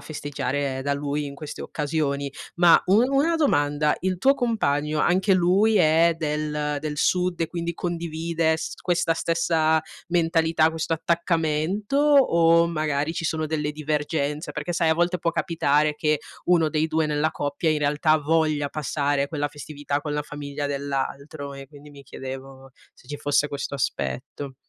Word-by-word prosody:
festeggiare 145 -2 -3
da 140 +1 0
lui 145 +1 -2
in 140 - -8
queste 150 0 -7
occasioni. 145 -2 -2 0.3
Ma, 175 -1 +6
un 215 +7 +4
una 285 +5 +2
domanda: 150 - +2
il 185 -1 -1
tuo 270 +9 +4
compagno, 155 - 0
anche 185 +5 +2
lui 190 +5 +3
è 165 -1 +4
del 150 -1 -2
del 150 0 -4
sud, 180 +3 +1
e 165 - +1
quindi 170 0 -4
condivide 165 -1 -1
s 160 - -5
questa 175 -2 +1
stessa 165 -1 +1 0.3
mentalità, 165 -2 +2
questo 160 0 -3
attaccamento? 165 - -1
O, 170 - +5
magari, 155 -2 -1
ci 165 - -4
sono 155 0 -1
delle 150 -1 -2
divergenze? 150 0 -2
Perché, 150 +3 -4
sai, 165 -1 +1
a 160 - +4
volte 175 +2 +1
può 170 0 0
capitare 155 -3 +1
che 150 0 +1 0.3
1 170 -3 +4
dei 155 +1 0
2 160 0 +1
nella 150 +1 0
coppia, 145 +3 -1
in 155 - +1
realtà, 150 +2 +2
voglia 155 -1 +1
passare 140 -1 -1
quella 145 -1 -2
festività 145 -1 -4
con 150 0 -4
la 150 0 -1
famiglia 145 -1 -5
dell'altro, 140 +1 -4
e 135 0 -9
quindi 145 +1 -15
mi 140 -1 -13
chiedevo 135 0 -9 0.2
se - - -22
ci 145 - -5
fosse 145 0 +1
questo 140 0 -5
aspetto. 140 0 -4
155 Hz, 160 wpm, -24 LUFS, 145-170 Hz, 0.3 s, Ma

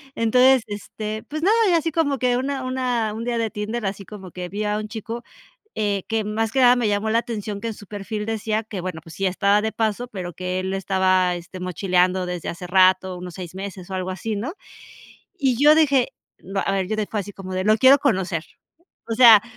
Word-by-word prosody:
Entonces, 250 +3 +5
este, 215 +1 -5
pues 310 +1 -4
nada, 410 +6 +4
y - - +3
así 330 0 +1
como 285 -4 0
que 250 -1 +2
una 265 0 -2
una, 250 -4 -1
un 225 +1 -5
día 240 -1 -1
de 225 -1 0
Tinder, 210 +2 -4
así 195 0 -4
como 190 -4 -10
que 180 -1 -6
vi 210 +2 -3
a 210 0 0
un 215 0 -4
chico, 230 +2 -6 0.5
eh, 205 -3 -1
que 225 -1 0
más 220 +1 -1
que 265 - +2
nada 245 0 +7
me 240 -4 0
llamó 205 +2 0
la 230 - +3
atención 210 -3 -4
que 230 - -3
en 220 - -4
su 205 - -13
perfil 210 +1 -5
decía 220 0 -1
que 205 -4 -6
bueno, 180 -3 -5
pues 165 -2 -12
sí, 195 0 -1
estaba 200 +2 +3
de 220 +1 -2
paso, 225 +2 -1
pero 180 -5 -6
que 185 +1 -3
él 190 +1 -3
estaba, 185 -2 +2
este, 175 +2 -9
mochileando 180 0 +1
desde 180 -2 -4
hace 180 +1 -5
rato, 185 0 +4
unos 180 -2 -8
6 180 -1 -8
meses 190 -1 -7
o - - -4
algo 185 0 -2
así, 210 +3 -3
¿no? 260 - -4 0.8
Y 260 -4 +2
yo 300 +1 +8
dije 280 -5 +3 0.3
no, 195 +1 -3
a 195 - 0
ver, 190 -1 -1
yo 215 - -1
dije 215 -1 -2
así 205 -1 -3
como 185 -1 -8
de: 185 0 -1
"Lo 215 +1 +4
quiero 265 +3 +7
conocer.", 185 - 0 0.6
o 225 - -1
sea, 225 -4 +8
210 Hz, 225 wpm, -23 LUFS, 185-235 Hz, 0.8 s, yo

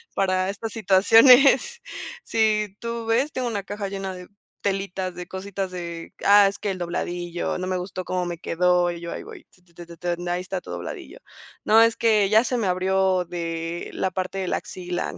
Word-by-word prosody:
para 185 -1 +1
estas 220 +3 -5
situaciones, 240 - +5 0.4
si 215 -3 +1
tú 235 0 -4
ves, 240 +6 +1
tengo 255 -3 -2
una 210 -4 -3
caja 205 +1 -5
llena 195 -1 -4
de 180 0 -10 0.3
telitas, 190 -2 -2
de 180 0 -7
cositas 190 0 -5
de, 170 -2 -7
ah, 205 0 +7
es 195 - -4
que 205 - -2
el 190 - -4
dobladillo, 175 0 -3
no 185 - -3
me 185 0 -1
gustó 185 +1 -5
cómo 180 -1 -1
me 175 -1 -5
quedó, 180 +1 +2
y 170 - -7
yo 170 - -6
ahí - - -6
voy, - - -12
t 180 - -26
t 175 -1 -29
t 175 0 -10
t 170 0 -13 0.2
t 175 +1 -6
ahí 175 +1 -1
está 185 0 -4
tu - - -10
dobladillo, - - -7 0.4
no, 220 +1 +6
es 230 0 +4
que 215 -3 +3
ya 220 +2 +5
se 250 0 -1
me 220 -4 0
abrió 185 0 +1
de 170 -1 -4
la 190 - -1
parte 185 +1 -3
de 190 - -2
la - - 0
axila, 180 -1 -5
190 Hz, 205 wpm, -24 LUFS, 180-210 Hz, 0.4 s, ah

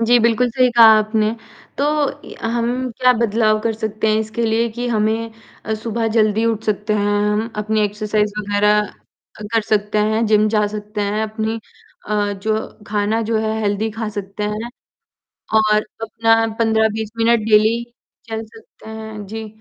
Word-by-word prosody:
जी, 240 +1 +4
बिल्कुल, 235 +2 +2
सही 255 +1 +3
कहा 230 - +9
आपने। 215 0 +1 0.5
तो 280 - +1 0.4
य - - -10 0.2
हम 245 +2 -1
क्या 255 0 +6
बदलाव 220 -2 +2
कर 225 +1 0
सकते 220 0 -2
हैं 215 - +3
इसके 220 +2 -3
लिए 225 +1 +1
कि 245 +2 -4
हमें 225 0 0 0.3
अ, 220 - -1
सुबह 225 +1 -2
जल्दी 215 0 +3
उठ 225 -1 -1
सकते 210 0 -1
हैं, 205 0 +1
हम 220 +2 -1
अपनी 215 +1 0
एक्सरसाइज़ 210 0 -1
वग़ैरह 210 0 +2 0.6
अ, - - -6
कर 225 - +3
सकते 210 0 +1
हैं, 220 +1 +1
जिम 215 0 +3
जा 210 -1 +3
सकते 210 0 -5
हैं, 205 +1 -1
अपनी 220 +1 -3 0.5
अ, 205 -1 0
जो 215 +2 -2 0.2
खाना 210 +1 0
जो 225 - +2
है 220 0 -1
हेल्थी 210 +1 0
खा 225 -2 -2
सकते 200 +1 -5
हैं। 230 +3 -5 0.8
और 215 -1 +4 0.2
अपना 225 0 +2
15-20 220 -1 +1
मिनट 230 0 +3
डेली 220 +2 +4 0.4
चल 220 0 -3
सकते 220 0 -16
हैं। 220 -1 -7
जी, 220 +2 -6
220 Hz, 165 wpm, -19 LUFS, 210-225 Hz, 0.8 s, कहा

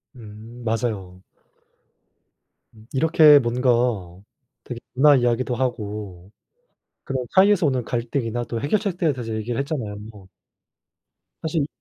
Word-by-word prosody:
음. 115 +1 -12
맞아요. 105 -5 -3 1.5
음. 110 0 -18
이렇게 155 +1 +6
뭔가 125 0 0 0.9
되게 120 -2 -7
문화 145 +3 +6
이야기도 120 0 +1
하고 105 -7 -4 0.7
그런 130 -2 -3
사이에서 195 -1 +4
오는 130 -4 +1
갈등이나 120 0 -2
또 115 -1 -4
해결책들에 175 -1 0
대해서 115 -4 -5
얘기를 115 +4 -3
했잖아요. 130 -8 -3 1.5
사실 155 -2 -1
120 Hz, 255 characters per minute, -23 LUFS, 110-140 Hz, 1.5 s, 이렇게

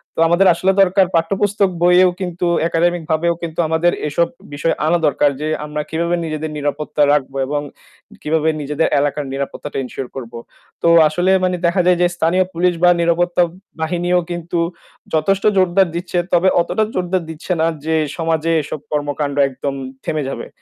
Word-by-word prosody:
তো - - -6
আমাদের 180 +3 +4
আসলে 185 +3 +1
দরকার 190 0 +4
পাঠ্যপুস্তক 195 +4 +1
বইয়েও 180 +1 +5
কিন্তু 180 -1 -3 0.2
একাডেমিক 170 0 0
ভাবেও 170 +2 +2
কিন্তু 165 0 -5
আমাদের 160 +2 +2 0.2
এসব 170 +3 +1 0.3
বিষয় 145 +3 0
আনা 175 +2 +3
দরকার 145 0 +2
যে 155 - -2 0.2
আমরা 150 0 -4
কিভাবে 170 +2 0
নিজেদের 155 0 -4
নিরাপত্তা 145 +1 -2
রাখবো 135 -2 -1
এবং 145 0 -1 0.6
কিভাবে 160 +1 +1
নিজেদের 150 +2 0
এলাকার 145 0 -1
নিরাপত্তাটা 140 +1 -5
ensure 125 0 -6
করবো। 120 -2 -7 0.4
তো - - +1 0.2
আসলে 175 +5 +1
মানে 180 0 +1
দেখা 175 +2 +2
যায় 180 -1 +4
যে 175 - +5
স্থানীয় 175 +3 +2
পুলিশ 175 +1 +2
বা 180 - +7
নিরাপত্তা 175 +1 +2 0.4
বাহিনীও 175 +2 +1
কিন্তু 175 0 -3 0.5
যথেষ্ট 190 +5 +1
জোরদার 185 0 +3
দিচ্ছে 175 +1 -3 0.2
তবে 180 +2 +4
অতটা 215 +5 0
জোরদার 180 -1 -1
দিচ্ছে 160 +3 -7
না 160 - +3 0.2
যে 160 0 +1 0.2
সমাজে 165 -1 0
এসব 150 0 -6
কর্মকাণ্ড 145 -1 -2
একদম 135 +1 -4 0.3
থেমে 155 -2 -1
যাবে। - - -6
165 Hz, 160 wpm, -18 LUFS, 150-180 Hz, 0.6 s, বা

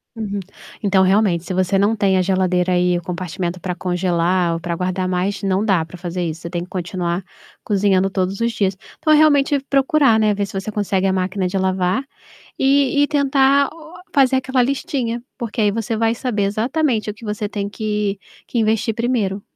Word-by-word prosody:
Uhum. 205 -3 -3 0.4
Então, 195 -3 +3
realmente, 190 -3 +2
se 185 - -5
você 185 +1 +1
não 205 +3 +2
tem 195 -3 +2
a - - +3
geladeira 185 -1 +1
aí, 180 0 +2
o - - -4
compartimento 180 0 -4
pra 180 0 -4
congelar 180 -1 0
ou 165 - -3
pra 170 0 -3
guardar 185 +1 -2
mais, 190 +3 -1
não 195 +1 +1
dá 190 -7 +2
pra 165 - -12
fazer 175 0 -4
isso, 160 -1 -4
você 170 - -6
tem 175 0 -3
que 180 - -12
continuar 175 0 -3 0.4
cozinhando 195 -2 +2
todos 190 0 -2
os 235 0 +1
dias. 195 -3 0 0.2
Então 310 - +3
é - - +7
realmente 290 -2 +4
procurar, 275 -3 +3
né, 215 -1 +3
ver 200 0 -1
se 195 - -4
você 205 +3 -5
consegue 200 -2 0
a 190 - +2
máquina 185 0 -1
de 190 +2 -2
lavar 190 +4 0 0.6
e 280 +1 +3
e - - +4
tentar 280 -1 +3
o 320 0 -13 0.3
fazer 270 -2 +4
aquela 260 -1 +1
listinha, 255 -3 -2 0.2
porque 235 -3 -4
aí 210 -1 +3
você 225 +1 -2
vai 225 +1 +1
saber 230 -4 -1
exatamente 225 +2 0
o - - -7
que 230 - -14
você 210 -1 -3
tem 200 -1 -3
que 210 -1 -2 0.3
que 240 - -3
investir 220 0 +1
primeiro. 215 -4 -1
200 Hz, 200 wpm, -20 LUFS, 185-230 Hz, 0.6 s, é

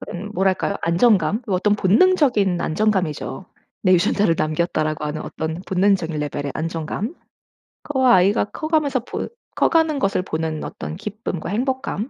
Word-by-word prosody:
그 - - -8 0.2
뭐랄까요? 190 +1 +1
안정감? 185 +3 +3
어떤 205 +1 +2
본능적인 210 - +3
안정감이죠. 185 -2 -1 0.4
'내 185 - +4
유전자를 175 +1 +2
남겼다.'라고 155 -1 -1
하는 150 +1 -3
어떤 160 +2 -4
본능적인 185 -4 +1
레벨의 145 -1 -3
안정감. 165 - -3 0.7
그 290 -3 -3
아이가 205 -4 +4
커가면서 305 +1 0
보 235 - -5 0.3
커가는 320 -3 +2
것을 195 -6 +1
보는 160 -3 -3
어떤 - - -6
기쁨과 200 -3 -5
행복감. 255 +1 -2
190 Hz, 335 characters per minute, -21 LUFS, 165-230 Hz, 0.7 s, 내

